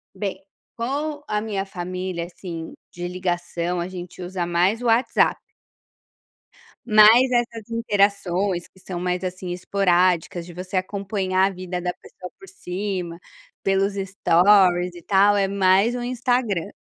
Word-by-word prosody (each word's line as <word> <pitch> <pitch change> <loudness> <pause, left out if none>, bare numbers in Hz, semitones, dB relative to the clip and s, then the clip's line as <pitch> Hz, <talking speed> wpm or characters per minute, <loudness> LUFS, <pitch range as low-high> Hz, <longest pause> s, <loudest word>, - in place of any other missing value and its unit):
Bem, 195 -3 -3 0.4
com 290 +5 -3
a 210 0 -1
minha 205 -3 -3
família 180 -2 -4
assim 170 -2 -8 0.2
de 175 0 -5
ligação, 175 -1 -2
a 170 - -2
gente 180 0 -9
usa 180 0 -3
mais 180 +7 +1
o - - -5
WhatsApp. 230 +2 +3 1.5
Mas 220 +3 +7
essas 235 -2 -1
interações 200 -5 0
que 190 - -23
são 185 -1 -6
mais, 180 +1 -2
assim, 185 0 -5
esporádicas 180 -2 +1
de 175 - -11
você 185 +2 -4
acompanhar 190 0 0
a - - -1
vida 180 -1 -5
da 180 0 -2
pessoa 180 0 -12
por 390 - -13
cima, 180 - -5 0.4
pelos 195 +1 +1
stories 185 -1 +3
e 175 - -10
tal 200 +2 +4
é 195 -1 +2
mais 195 +4 +3
o 245 - -3
Instagram. 245 -6 -1
190 Hz, 140 wpm, -23 LUFS, 180-205 Hz, 1.5 s, Mas